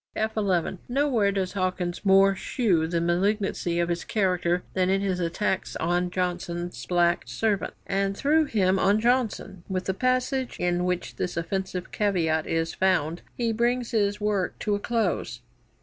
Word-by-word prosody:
"' - - -39
[F 220 0 -1
11] 190 -4 0
Nowhere 245 -6 +2
does 190 -2 -2
Hawkins 185 -2 -2
more 195 0 +5
shew 190 -4 0
the 170 0 0
malignancy 175 0 0
of 170 0 +1
his 170 0 -1
character 180 -4 0
than 185 -1 +1
in 195 +1 +2
his 190 -2 -1
attacks 180 +3 -1
on 175 +2 0
Johnson's 175 -1 -3
black 175 -1 +2
servant, 215 -3 -1
and 195 0 -1
through 310 +2 +3
him 195 -7 +2
on 200 +3 +3
Johnson. 225 -6 0
With 185 -1 -2
the 190 - 0
passage 255 +3 0
in 175 0 +1
which 180 -1 -2
this 180 - -3
offensive 185 +1 -3
caveat 165 -7 0
is 165 0 -1
found 175 -3 +1 0.2
he 235 -2 0
brings 240 +2 0
his 205 -2 +1
work 205 -3 -1
to 210 - -1
a 205 - 0
close. 200 - -1
190 Hz, 165 wpm, -26 LUFS, 175-210 Hz, 0.2 s, more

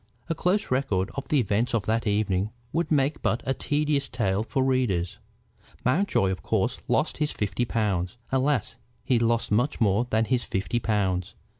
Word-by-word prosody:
A - - +3
close 180 +4 0
record 110 -8 0
of 140 - -5
the 150 - +2
events 115 +1 +1
of 110 - 0
that 115 +1 0
evening 100 -1 +1 0.2
would 170 +1 0
make 145 0 +2
but 120 - 0
a 135 - +1
tedious 145 -1 0
tale 100 -5 0
for 130 +4 0
readers. 120 -10 0 0.7
Mountjoy 130 - +2
of 95 - -4
course - - 0
lost - - +1
his 150 -1 +1
fifty 105 +3 -1
pounds. 105 -3 -1
Alas! 135 -3 +1 0.3
he 125 -1 +2
lost 115 -1 +1
much 120 +8 +1
more 110 +1 +2
than 110 0 +2
his 125 0 +1
fifty 110 +3 -1
pounds. 95 -4 -1
115 Hz, 170 wpm, -26 LUFS, 100-135 Hz, 0.7 s, A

